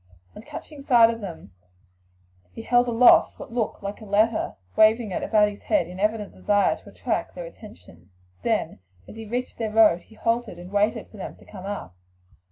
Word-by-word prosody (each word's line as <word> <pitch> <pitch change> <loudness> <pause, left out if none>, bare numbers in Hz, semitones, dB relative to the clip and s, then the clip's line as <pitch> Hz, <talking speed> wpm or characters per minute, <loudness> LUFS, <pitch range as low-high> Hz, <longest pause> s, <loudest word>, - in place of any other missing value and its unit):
On - - -9
catching 290 +5 -10
sight 240 -4 +5
of 230 0 -7
them 170 - -8 1.0
he 225 - -8
held 245 +1 +3
aloft 240 +1 +5
what - - -10
looked 230 -4 -2
like 200 +2 -5
a - - -9
letter, 215 +3 +1 0.2
waving 220 0 +4
it - - -2
about 210 -2 +3
his 205 - -11
head 170 - +1
in 180 +1 -9
evident 210 0 -1
desire 205 -1 +2
to - - -16
attract - - -3
their - - -6
attention; 90 - -14 0.3
then - - -1 0.3
as - - -11
he 225 -1 -8
reached 245 +3 -4
their 225 -2 -1
road 210 -5 +5
he 220 - -19
halted 230 -4 -1
and 175 +2 -11
waited 210 +2 0
for 215 - -15
them 195 - -7
to - - -19
come 195 -2 -10
up. 200 - -6
215 Hz, 190 wpm, -24 LUFS, 200-230 Hz, 1.0 s, sight